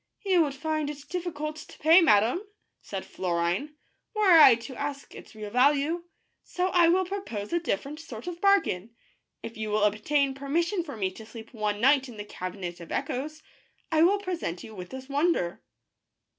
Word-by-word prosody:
"You 370 -3 +4
would 285 -3 0
find 310 +1 -2
it 290 -1 -8
difficult 310 -4 -4
to 310 - -12
pay, 325 +4 +6
madame," 225 - +4 0.4
said 195 -2 -6
Florine, 180 - -2 0.2
" - - -51
were 420 -3 +4
I 310 -7 +9
to 235 +3 -9
ask 280 0 -5
its - - -13
real 210 -1 -7
value, 290 +7 +2 0.4
so 360 +1 -1
I 350 -2 +5
will 370 +2 +3
propose 350 - -5
a 345 - +3
different 295 - -3
sort 240 -6 -9
ot 350 0 -6
bargain. 235 - +2 0.5
If 225 - -7
you 215 -1 -3
will 210 0 +1
obtain 270 +7 +1
permission 335 +7 -1
for 285 -7 -8
me 190 -2 -1
to 220 +4 -11
sleep 225 +1 -11
one 210 -2 -2
night 270 +2 +4
in 230 - -11
the 205 - -6
Cabinet 180 -3 -6
of 170 - -11
Echoes, 305 +4 -3 0.5
I 315 -1 +3
will 375 +5 +5
present 355 - -4
you 220 - -10
with 180 -3 -8
this 260 0 -8
wonder." 280 - 0
280 Hz, 185 wpm, -27 LUFS, 215-335 Hz, 0.5 s, I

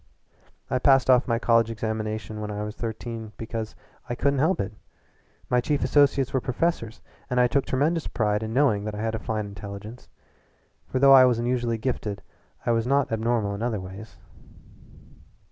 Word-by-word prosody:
"I 130 - 0
passed 135 -1 +5
off 125 -1 +4
my 115 -2 +1
college 115 -1 +3
examinations 110 -1 -4
when 105 0 -4
I 105 0 -4
was 105 0 -6
thirteen 115 -1 -6
because 110 -1 -5 0.3
I 120 - -2
couldn't 140 +2 +1
help 160 +7 +2
it. 100 +2 -3 0.7
My 125 0 +2
chief 145 +3 0
associates 135 0 +3
were 130 - +1
professors, 125 -4 -2 0.3
and 125 - +1
I 125 - +6
took 135 +3 +1
a - - -27
tremendous 155 +5 0
pride 105 -2 0
in 110 0 -4
knowing 120 -5 +2
that 105 -1 -4
I 105 - -5
had 110 0 -1
a 110 - -2
fine 110 -2 -3
intelligence, 100 +3 -9 0.8
for - - -2
though 135 +1 +7
I 130 -1 +9
was 125 -2 +3
unusually 120 -1 0
gifted 105 -4 -3 0.4
I 120 - +2
was 115 0 +1
not 140 -1 +2
abnormal 110 -2 0
in 100 - -6
other 115 -3 -1
ways. 95 +3 -10
115 Hz, 180 wpm, -25 LUFS, 110-130 Hz, 0.8 s, I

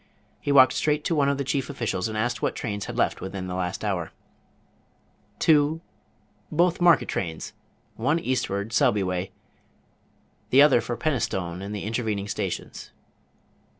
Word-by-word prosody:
He 145 - -2
walked 130 -2 +7
straight 150 -1 0
to - - 0
one 140 -2 +3
of 140 - 0
the 140 - -1
chief 135 -1 -2
officials, 115 -7 -2
and 110 -1 -4
asked 120 +3 -1
what - - -1
trains 105 -3 -4
had - - -6
left - - +1
within 95 0 -5
the 90 - -5
last 90 +3 -3
hour. 90 -5 -2 1.3
"Two, 155 0 +3 0.7
both 175 +2 +2
market 175 -3 +5
trains; 80 -4 -4 0.4
one 140 +8 +1
eastward, 115 -8 -2
Selby 120 -7 +3
way, 90 +1 -2 1.2
the 140 +3 +7
other 135 -5 +5
for 120 - -4
Penistone 115 - -2
and 100 +2 -5
the 100 - -5
intervening 110 -2 -2
stations." - - -4
115 Hz, 150 wpm, -25 LUFS, 100-140 Hz, 1.3 s, walked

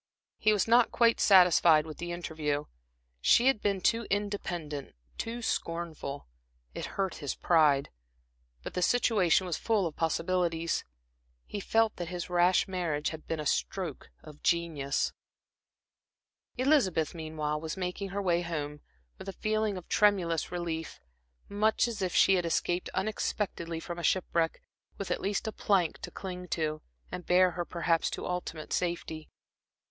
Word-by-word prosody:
He 215 - +4
was 210 -1 +2
not 235 +1 +5
quite 230 -1 +3
satisfied 175 -5 +6
with 155 -1 -9
the 175 0 -4
interview; 155 -4 -2 0.6
she 235 - +5
had 265 -5 +3
been 200 -2 0
too 230 +2 +1
independent, 175 -8 -3 0.2
too 235 +1 -4
scornful. 165 -7 -3 0.5
It - - -4
hurt 195 -2 -1
his 145 -3 -3
pride. 150 -5 +3 0.7
But - - -6
the 180 - -1
situation 195 -4 +3
was 175 -3 -2
full 215 -4 +1
of 160 - -4
possibilities. 170 0 0 0.6
He 205 - -5
felt 225 +2 +1
that 175 - -4
his 180 0 -5
rash 175 +1 +4
marriage 170 -6 -1
had 160 -1 -9
been 165 - -2
a 150 - -4
stroke 170 0 -2
of 150 -1 -13
genius. 160 -5 0 1.4
Elizabeth, 245 - +2
meanwhile, 155 -2 -3
was 160 +3 -5
making 185 +2 -3
her 200 +1 -3
way 175 -2 +2
home, 150 -4 -4 0.4
with 195 - -7
a - - -5
feeling 215 -1 -1
of 180 - -9
tremulous 180 -6 +2
relief, 170 -2 -4 0.5
much 215 +3 +2
as 230 -4 -5
if 185 -2 -1
she 195 - +6
had 180 -2 +2
escaped 175 +2 0
unexpectedly 190 -4 -2
from 175 +1 -6
shipwreck, 170 -2 0 0.3
with 200 - -5
at - - -1
least 200 0 -1
a - - -1
plank 190 -6 +1
to - - -7
cling 180 -1 -7
to, 155 -2 -2 0.3
and 180 - -6
bear 180 0 +5
her 175 +1 -3
perhaps 170 -1 0
to - - -5
ultimate 175 -3 -4
safety. 170 -3 -3
175 Hz, 150 wpm, -30 LUFS, 160-195 Hz, 1.4 s, satisfied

